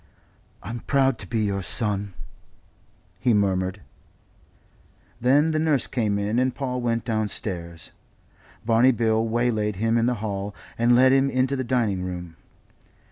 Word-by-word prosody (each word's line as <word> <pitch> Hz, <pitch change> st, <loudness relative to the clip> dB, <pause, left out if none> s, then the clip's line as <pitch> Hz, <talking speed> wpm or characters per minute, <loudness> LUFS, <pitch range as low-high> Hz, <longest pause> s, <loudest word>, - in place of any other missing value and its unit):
"I'm 115 Hz, +5 st, -5 dB
proud 135 Hz, 0 st, +1 dB
to 95 Hz, -, -6 dB
be 115 Hz, +1 st, -1 dB
your 100 Hz, -2 st, -1 dB
son," 100 Hz, -1 st, 0 dB, 1.0 s
he 120 Hz, +2 st, +2 dB
murmured. 95 Hz, -1 st, 0 dB, 1.4 s
Then 145 Hz, +6 st, +3 dB
the 155 Hz, -, 0 dB
nurse 155 Hz, -6 st, +1 dB
came 110 Hz, -5 st, -1 dB
in 105 Hz, +4 st, 0 dB
and 130 Hz, 0 st, 0 dB
Paul 125 Hz, -2 st, -3 dB
went 115 Hz, -1 st, -1 dB
downstairs. 95 Hz, -7 st, -3 dB, 0.7 s
Barney 120 Hz, +3 st, +4 dB
Bill 110 Hz, -1 st, +1 dB
waylaid 110 Hz, -3 st, 0 dB
him 115 Hz, +4 st, +1 dB
in 115 Hz, -, +1 dB
the 125 Hz, -, +1 dB
hall, 100 Hz, -2 st, -4 dB, 0.2 s
and 120 Hz, +1 st, +3 dB
led 130 Hz, +1 st, +5 dB
him 135 Hz, 0 st, +3 dB
into 130 Hz, +1 st, 0 dB
the 130 Hz, -, -2 dB
dining 115 Hz, -7 st, 0 dB
room. 90 Hz, -2 st, -6 dB
115 Hz, 140 wpm, -24 LUFS, 100-125 Hz, 1.4 s, led